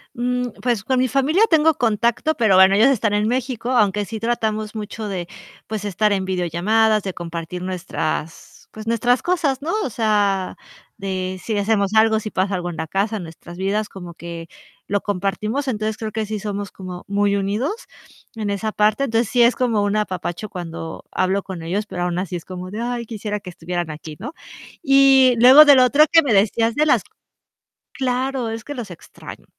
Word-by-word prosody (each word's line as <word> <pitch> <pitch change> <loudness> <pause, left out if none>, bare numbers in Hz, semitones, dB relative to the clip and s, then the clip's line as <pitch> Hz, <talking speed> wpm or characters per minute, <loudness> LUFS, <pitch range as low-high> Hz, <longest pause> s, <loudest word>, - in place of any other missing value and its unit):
Mm, 250 +1 -1
pues 235 -5 0
con 260 +2 +1
mi 255 - +2
familia 275 - +2
tengo 320 -1 +4
contacto, 235 +5 +1
pero 220 -8 +3
bueno, 190 +1 +7
ellos 220 +6 +5
están 225 -6 +1
en 210 +1 +1
México, 245 -1 -2
aunque 210 -4 +2
sí 220 +2 -7
tratamos 220 -2 -2
mucho 215 0 -6
de, 180 -3 -4 0.4
pues, 215 -1 -5
estar 205 +1 +1
en 190 -1 0
videollamadas, 190 +5 +1
de 190 -2 -5
compartir 170 +1 -6
nuestras, 170 -3 -5
pues, 215 0 -9
nuestras 240 +2 +1
cosas, 305 -7 0
¿no? 325 +4 -2
O - - -3
sea, 205 -4 0 0.4
de 185 -1 -4
si 220 -2 -2
hacemos 205 0 +1
algo, 220 0 +4
si 215 - -6
pasa 190 +1 -1
algo 175 -1 -3
en 170 - -7
la 160 - -4
casa, 200 +5 -1
en - - -7
nuestras 170 +1 -11
vidas, 205 +3 -1
como 175 -3 -10
que 170 0 -8 0.4
lo 205 0 0
compartimos. 210 +7 -2
Entonces, 215 -3 -2
creo 220 -1 -4
que 220 0 -2
sí 215 0 -4
somos 205 -1 -5
como 185 -2 -8
muy 200 0 +1
unidos 205 - -1 0.6
en 215 -3 -3
esa 215 +2 -2
parte. 215 +6 +2
Entonces, 230 -3 0
sí 245 0 +3
es 235 0 +5
como 230 -5 +1
un 205 +1 0
apapacho 185 -1 -3
cuando 165 -4 -7
hablo 190 +2 0
con 185 -4 -7
ellos, 195 +6 -2
pero 180 -4 -5
aún 175 0 -2
así 185 -1 -4
es 170 - -8
como 185 0 -7
de: 210 +3 -5
"Ay, 240 -1 -3
quisiera 210 -2 -4
que 185 - -9
estuvieran 175 -1 -4
aquí", 155 0 -8
¿no? 235 +9 -7 0.5
Y 270 -3 +6
luego 260 +6 +9
de 290 -1 +8
lo 255 - +6
otro 285 +4 +5
que 330 0 +6
me 275 -6 0
decías 225 +3 +2
de 305 +1 +2
las - - +3 0.9
claro, 260 -1 -1
es 225 0 -5
que 290 - -7
los 230 -7 -6
extraño. 170 - -12
215 Hz, 195 wpm, -21 LUFS, 190-240 Hz, 0.9 s, luego